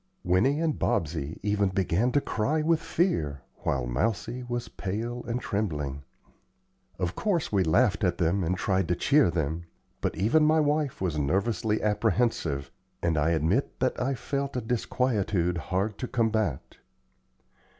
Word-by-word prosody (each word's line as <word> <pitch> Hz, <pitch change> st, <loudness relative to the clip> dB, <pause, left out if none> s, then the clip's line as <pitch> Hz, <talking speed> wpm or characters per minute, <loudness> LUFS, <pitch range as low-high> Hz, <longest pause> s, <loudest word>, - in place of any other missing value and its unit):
Winnie 120 Hz, -, +3 dB
and 160 Hz, -2 st, 0 dB
Bobsey 80 Hz, -2 st, -1 dB
even 105 Hz, -1 st, +2 dB
began 95 Hz, +5 st, +1 dB
to 145 Hz, -, +3 dB
cry 150 Hz, +9 st, 0 dB
with 165 Hz, 0 st, +3 dB
fear, 80 Hz, -, 0 dB
while 65 Hz, -3 st, -1 dB
Mousie 110 Hz, -, -1 dB
was 120 Hz, -1 st, -4 dB
pale 115 Hz, +5 st, -4 dB
and 120 Hz, +1 st, -1 dB
trembling. 75 Hz, -, -2 dB, 1.0 s
Of 85 Hz, -1 st, -2 dB
course, 185 Hz, -7 st, 0 dB
we 100 Hz, -3 st, +3 dB
laughed 100 Hz, +6 st, +2 dB
at 90 Hz, -2 st, +2 dB
them 90 Hz, +3 st, +1 dB
and 90 Hz, +3 st, 0 dB
tried 95 Hz, -2 st, +1 dB
to 90 Hz, -, +1 dB
cheer 140 Hz, -, +4 dB
them; 80 Hz, 0 st, -2 dB, 0.4 s
but -, -, -1 dB
even 115 Hz, -, +3 dB
my 155 Hz, +1 st, +4 dB
wife 150 Hz, -4 st, 0 dB
was 85 Hz, -5 st, 0 dB
nervously 105 Hz, +8 st, 0 dB
apprehensive, 105 Hz, -, 0 dB, 0.3 s
and 85 Hz, -1 st, +2 dB
I 75 Hz, +1 st, +2 dB
admit 85 Hz, -, 0 dB
that 130 Hz, 0 st, 0 dB
I 135 Hz, +2 st, 0 dB
felt 140 Hz, +1 st, -3 dB
a -, -, -1 dB
disquietude 105 Hz, -7 st, 0 dB
hard 100 Hz, +3 st, -1 dB
to 125 Hz, -, -3 dB
combat. 110 Hz, -, -1 dB
105 Hz, 150 wpm, -27 LUFS, 85-125 Hz, 1.0 s, cheer